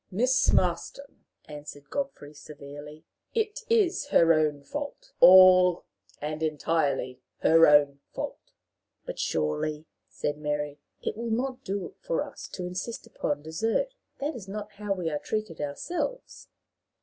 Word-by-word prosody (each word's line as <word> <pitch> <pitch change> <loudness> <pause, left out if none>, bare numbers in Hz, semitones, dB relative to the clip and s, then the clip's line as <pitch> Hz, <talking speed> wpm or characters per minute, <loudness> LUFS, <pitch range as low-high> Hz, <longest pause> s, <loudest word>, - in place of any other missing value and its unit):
"Miss 250 +7 +3
Marston," 180 +10 -1 0.2
answered 145 -1 -10
Godfrey, 275 - -4
severely, 145 +1 -11 0.3
"it 440 -2 0
is 400 -9 +2
her 165 - +5
own 150 -2 +1
fault 290 - -6
all 185 -1 +8 0.3
and 155 +1 -4
entirely 145 -4 0 0.2
her 165 +1 +6
own 145 -1 +5
fault." - - -5 0.7
"But, - - -6
surely," 80 - -1 0.2
said 145 0 -3
Mary, 150 -1 -3 0.2
"it - - -2
will 235 0 -3
not 255 +3 -2
do 200 -4 -4
for - - -1
us - - -9
to 180 - -4
insist 185 +6 -5
upon 145 0 -3
desert. 225 - -1 0.2
That 290 +3 -2
is 210 -5 -8
not 210 +1 -6
how 205 0 -6
we 180 -3 -3
are 150 - -2
treated 215 -6 -4
ourselves." 345 - -4
175 Hz, 135 wpm, -27 LUFS, 150-240 Hz, 0.7 s, all